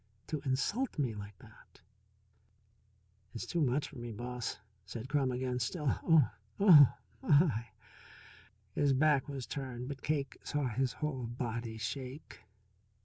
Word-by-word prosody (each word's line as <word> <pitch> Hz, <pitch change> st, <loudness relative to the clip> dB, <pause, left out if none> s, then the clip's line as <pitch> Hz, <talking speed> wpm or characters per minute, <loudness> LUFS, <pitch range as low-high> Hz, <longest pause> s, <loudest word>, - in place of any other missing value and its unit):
To 155 Hz, -3 st, -2 dB
insult 155 Hz, -, 0 dB
me 130 Hz, -6 st, 0 dB
like 100 Hz, -1 st, -8 dB
that -, -, -18 dB, 0.7 s
" 100 Hz, -2 st, -38 dB
"It's 115 Hz, -, -4 dB
too 170 Hz, -, -1 dB
much 140 Hz, +1 st, +1 dB
for 140 Hz, -, -10 dB
me, 120 Hz, 0 st, -6 dB
Boss," 120 Hz, +2 st, -4 dB, 0.3 s
said 110 Hz, +6 st, -7 dB
Crum 135 Hz, -2 st, +1 dB
again. 125 Hz, 0 st, -2 dB
"Still 135 Hz, +3 st, 0 dB
Oh 160 Hz, -6 st, +6 dB, 0.3 s
oh, 165 Hz, -, +9 dB, 0.3 s
my!" 140 Hz, -6 st, +3 dB, 1.1 s
His 145 Hz, -2 st, +3 dB
back 145 Hz, 0 st, +3 dB
was 135 Hz, -3 st, -4 dB
turned, 130 Hz, -3 st, -5 dB
but 140 Hz, -1 st, -6 dB
Cake 145 Hz, -2 st, -1 dB
saw 145 Hz, -2 st, -1 dB
his 125 Hz, +2 st, 0 dB
whole 135 Hz, -6 st, -3 dB
body 115 Hz, -1 st, -4 dB
shake. 130 Hz, +6 st, -6 dB
130 Hz, 140 wpm, -33 LUFS, 115-145 Hz, 1.1 s, oh